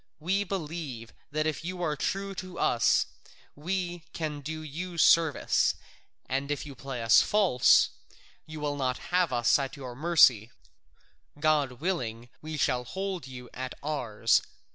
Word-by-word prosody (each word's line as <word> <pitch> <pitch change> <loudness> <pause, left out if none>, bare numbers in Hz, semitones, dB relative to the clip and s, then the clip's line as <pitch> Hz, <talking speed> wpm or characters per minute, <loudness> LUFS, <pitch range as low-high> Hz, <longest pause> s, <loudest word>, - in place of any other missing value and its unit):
We 190 +6 0
believe 155 - -5 0.2
that 155 +1 -1
if 155 +1 -2
you 180 +1 -4
are 155 -3 0
true 195 +6 -2
to 185 -2 -7
us 115 - +3 0.5
we 175 +3 -3
can 155 -3 -3
do 155 +2 -5
you 170 +4 -6
service, 165 -3 +4 0.5
and 135 +2 -2
if 145 0 -2
you 145 - -8
play 130 -2 -6
us 115 - +7
false, 195 -12 +4 0.6
you 155 0 -8
will 145 -1 -2
not 130 -2 -1 0.2
have 180 -4 +3
us 120 +2 +3
at 135 +1 -4
your 130 -3 -7
mercy; 135 -8 +5 0.9
God 150 -4 +2
willing, 120 -7 -3
we 155 0 -5
shall 125 -3 +1
hold 190 +3 -4
you 125 -1 -9
at 130 0 -5
ours. 115 -7 +1
150 Hz, 145 wpm, -28 LUFS, 130-175 Hz, 0.9 s, us